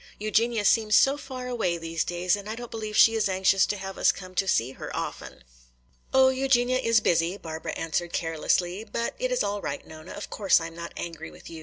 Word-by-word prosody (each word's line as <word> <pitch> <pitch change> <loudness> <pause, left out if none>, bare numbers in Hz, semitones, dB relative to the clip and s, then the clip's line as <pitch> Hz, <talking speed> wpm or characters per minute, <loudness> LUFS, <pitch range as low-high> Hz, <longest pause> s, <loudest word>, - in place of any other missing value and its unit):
Eugenia 215 +1 +1
seems 215 0 +4
so 270 +1 +5
far 260 -3 -7
away 220 -9 -1
these 165 -1 -2
days 175 +2 0
and 205 +1 -8
I 220 - -3
don't 240 0 -8
believe 215 -2 -4
she 225 - +7
is 220 -3 +1
anxious 190 0 +3
to 205 - -2
have 195 0 -7
us - - +5
come 185 -1 -10
to 195 +1 0
see 125 -7 +1
her - - -8
often." - - -6 0.7
"Oh, 265 0 +6
Eugenia 255 -1 +2
is 230 -3 +3
busy," 170 +1 +1
Barbara 160 -3 -6
answered 170 +1 -2
carelessly. 175 +4 -1
"But 230 +2 -3
it - - -1
is - - +1
all 205 0 -2
right, 140 - -5
Nona; 155 0 -11
of 205 - -8
course 200 -4 +3
I 165 - -5
am 165 0 -9
not 170 0 -7
angry 165 - -6
with 80 - -13
you. 165 - -8
200 Hz, 220 wpm, -26 LUFS, 170-230 Hz, 0.7 s, she